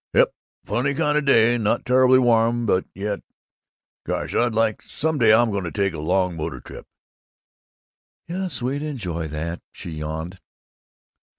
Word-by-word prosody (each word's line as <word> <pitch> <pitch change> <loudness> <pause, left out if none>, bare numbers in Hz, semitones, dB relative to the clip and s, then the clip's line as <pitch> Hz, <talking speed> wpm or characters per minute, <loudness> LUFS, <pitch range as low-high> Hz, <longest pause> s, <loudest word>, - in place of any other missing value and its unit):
Yep, - - +4 0.3
funny 125 +8 0
kind 150 +2 +1
of 150 - +2
a - - -8
day; 120 -2 +5
not 105 -1 0
terribly 130 0 +5
warm 120 -1 +3
but 95 -3 +1
yet 100 +1 -3 0.8
Gosh, - - -3
I'd 120 -2 +1
like 110 -1 +1
Some 160 -1 -2
day 110 -3 +5
I'm 115 +1 +4
going 100 -1 -2
to 85 - -4
take 100 -3 0
a 80 - -6
long 90 +3 0
motor 80 - -4
trip." - - -11 1.4
"Yes, 180 -5 -4
we'd 135 +3 -1
enjoy 95 - -4
that," 80 +3 -5
she 85 - -9
yawned. 80 +4 -5
110 Hz, 160 wpm, -23 LUFS, 90-130 Hz, 1.4 s, day